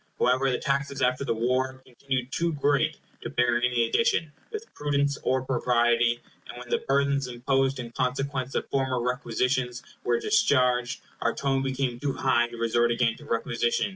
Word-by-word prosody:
However, 130 +2 +2
the 125 - +1
taxes 140 -1 -1
after 125 +2 +1
the 115 - -1
war 130 +3 0
continued 130 0 -4
too 170 +1 0
great 145 -1 +1 0.2
to - - -5
bear 120 -1 +2
any 120 -1 +2
addition, 165 - +1 0.2
with 435 0 -5
prudence 140 -1 0
or 130 0 +1
propriety; 120 -2 +2 0.3
and - - -8
when 125 0 -9
the - - +1
burthens 140 0 +1
imposed 135 +2 0
in 120 -2 -6
consequence 130 +1 -2
of - - -1
former 130 -2 0
requisitions 125 0 -1 0.2
were 120 -1 +1
discharged, 125 - +2 0.2
our 115 - +1
tone 135 -1 0
became 135 -2 -2
too 140 +1 -1
high 120 -3 +2
to 120 0 -10
resort 115 +1 +2
again 115 -1 +1
to 150 - -13
requisition. 120 - 0
130 Hz, 170 wpm, -27 LUFS, 120-140 Hz, 0.3 s, However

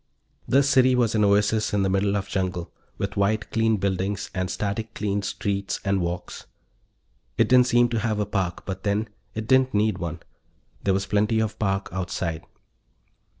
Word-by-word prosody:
The 140 +2 +4
city 130 -2 +4
was 120 -3 +2
an 110 -1 +2
oasis 105 +1 +2
in 100 - +2
the 95 - +1
middle 100 +1 +1
of 100 -1 -3
jungle, 90 -4 -2 0.3
with 100 0 -4
white 105 +2 0
clean 115 -1 +2
buildings 95 +1 -2
and 95 -2 -2
static 105 +3 -3
cleaned 100 -1 -1
streets 100 0 -2
and 100 -1 +1
walks. 85 +1 -5 0.9
It - - +4
didn't 125 -1 +5
seem 120 -1 +4
to 115 -1 -1
have 110 -1 -1
a 105 - +1
park, 95 -4 -2
but, 95 -1 -5
then, 105 +2 -1 0.3
it 110 0 -3
didn't 130 -2 +3
need 105 -2 +1
one. 85 -1 -4 0.6
There 95 -1 +2
was 95 - -1
plenty 105 +2 +1
of 110 -1 -2
park 95 -2 0
outside. 85 -3 -3
100 Hz, 175 wpm, -25 LUFS, 95-110 Hz, 0.9 s, didn't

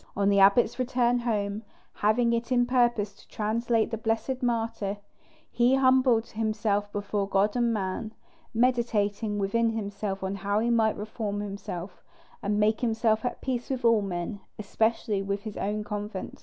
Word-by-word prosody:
On 200 0 +3
the 200 0 +4
abbot's 200 +6 +4
return 245 -1 +2
home, 210 -3 -1 0.3
having 235 +3 +2
it 235 +1 -2
in 245 -1 +4
purpose 240 -5 +1
to - - -20
translate 225 +1 0
the 225 - -3
blessed 225 +4 -1
martyr, 225 -4 -1 0.5
he 240 +2 +3
humbled 255 -3 +3
himself 215 -2 -1
before 205 0 -2
God 200 +3 +2
and 240 -1 +2
man, 210 +1 -3 0.4
meditating 225 -4 +1
within 225 +4 +1
himself 205 -2 -4
how 200 +1 -1
he 235 +2 +1
might 220 -2 +2
reform 210 -1 -4
himself, 195 -3 -6 0.4
and 205 +1 0
make 215 +1 +2
himself 225 -2 +1
at 245 - -3
peace 250 -2 -3
with 260 -2 -2
all 230 -2 +5
men, 190 +1 -4 0.2
especially 215 0 0
with 200 0 -3
his 215 -2 -6
own 210 +1 -2
convent. 210 -2 -5
220 Hz, 155 wpm, -27 LUFS, 205-235 Hz, 0.5 s, all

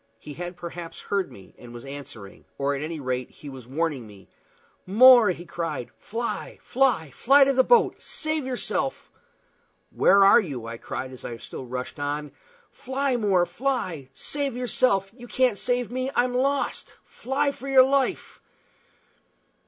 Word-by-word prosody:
He 150 - -10
had 175 +3 -7
perhaps 170 -1 -8
heard 200 -2 -2
me, 95 - -15
and 120 -1 -12
was 120 - -9
answering, 135 -8 -10
or, 140 +1 0
at 140 - -4
any 160 +1 -4
rate, 130 -2 -3
he 145 - -12
was 130 -3 -11
warning 140 -3 -2
me. 100 -2 -16 0.6
"More," 240 +2 +8
he 175 -1 -4
cried, 165 -8 -4
"fly, 235 +2 -4
fly, 245 - +1
fly 275 - +5
to 275 0 +2
the 260 0 +4
boat! 480 - +3
Save 310 -3 -3
yourself!" 265 +1 -3 0.8
"Where 200 0 +5
are 200 - +8
you?" 135 - -6
I 115 0 -6
cried, 130 +3 -6
as 130 - -11
I 120 - -6
still 130 - -9
rushed 125 +3 -6
on. 145 0 -3 0.4
"Fly, 265 0 -2
More, 195 -6 +2
fly! 180 - -3
Save 280 - -2
yourself! 230 -6 +1
You 245 0 -12
can't 245 -2 +1
save 245 -1 -1
me. 255 +1 -2
I'm 245 0 +2
lost. 275 +3 -1
Fly 280 +3 -1
for 275 0 -10
your 265 -1 +7
life!" 270 -1 -1
195 Hz, 160 wpm, -25 LUFS, -, 0.8 s, More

